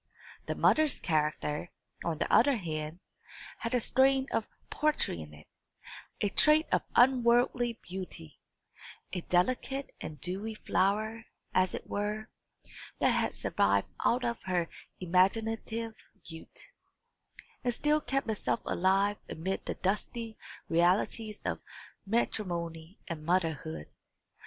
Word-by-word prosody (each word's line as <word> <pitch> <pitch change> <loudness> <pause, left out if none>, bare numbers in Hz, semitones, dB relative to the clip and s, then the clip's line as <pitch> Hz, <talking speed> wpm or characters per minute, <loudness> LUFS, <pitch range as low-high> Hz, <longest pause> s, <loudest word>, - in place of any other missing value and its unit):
The - - -1
mother's 310 -2 +3
character, 150 0 0 0.3
on 165 -2 -1
the - - -1
other 255 +2 +6
hand, 155 -2 -4 0.6
had 230 +2 -1
a - - +4
strain 265 +3 +3
of 220 - 0 0.2
poetry 300 - +1
in 75 -1 -9
it, 75 0 -14 0.8
a 205 - +2
trait 305 +8 +5
of - - +3
unworldly 245 -1 +4
beauty 180 - -8 0.7
a 180 - -1
delicate 255 +10 0
and 150 -2 -6
dewy 195 +8 -4
flower, 215 +3 0 0.3
as 185 0 +3
it - - -7
were, 210 +1 -2 0.7
that - - +3
had - - 0
survived - - +2
out 245 +1 +2
of 235 -1 -2
her 175 -2 +1 0.3
imaginative 225 +5 +1 0.3
youth, 160 -1 -10 1.0
and 245 - +2
still 300 +5 +2
kept 275 -2 -1
itself 165 - 0
alive 195 +3 +2
amid 185 +5 -3
the - - -2
dusty 220 +3 -2 0.3
realities 190 +5 +1
of - - -1 0.5
matrimony 175 -6 -2
and 160 -3 -5
motherhood. 160 - 0
200 Hz, 120 wpm, -31 LUFS, 170-235 Hz, 1.0 s, other